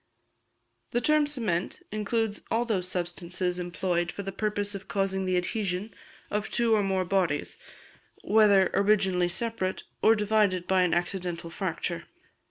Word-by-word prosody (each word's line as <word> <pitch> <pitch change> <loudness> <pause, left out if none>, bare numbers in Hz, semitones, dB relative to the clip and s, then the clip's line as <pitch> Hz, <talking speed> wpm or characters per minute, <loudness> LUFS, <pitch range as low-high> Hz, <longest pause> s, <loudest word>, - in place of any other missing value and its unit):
The 240 - +3
term 305 +2 +3
"cement" 220 -12 -2
includes 215 0 -1
all 235 +2 +1
those 190 -6 -1
substances 180 0 -2
employed 175 0 -1
for 200 - -6
the 195 - -4
purpose 205 0 -2
of 195 -1 -7
causing 190 -1 -1
the 185 -1 +2
adhesion 195 +2 -2 0.4
of 210 0 -1
two 235 -1 +2
or 215 - +4
more 190 -2 0
bodies, 180 -6 0 0.7
whether 205 -3 +5
originally 195 -3 +3
separate, 190 -1 -1 0.2
or 225 - +6
divided 210 -4 +2
by 190 -1 +3
an 180 -2 +2
accidental 175 -1 -3
fracture. 170 -1 -3
195 Hz, 140 wpm, -28 LUFS, 180-215 Hz, 0.7 s, or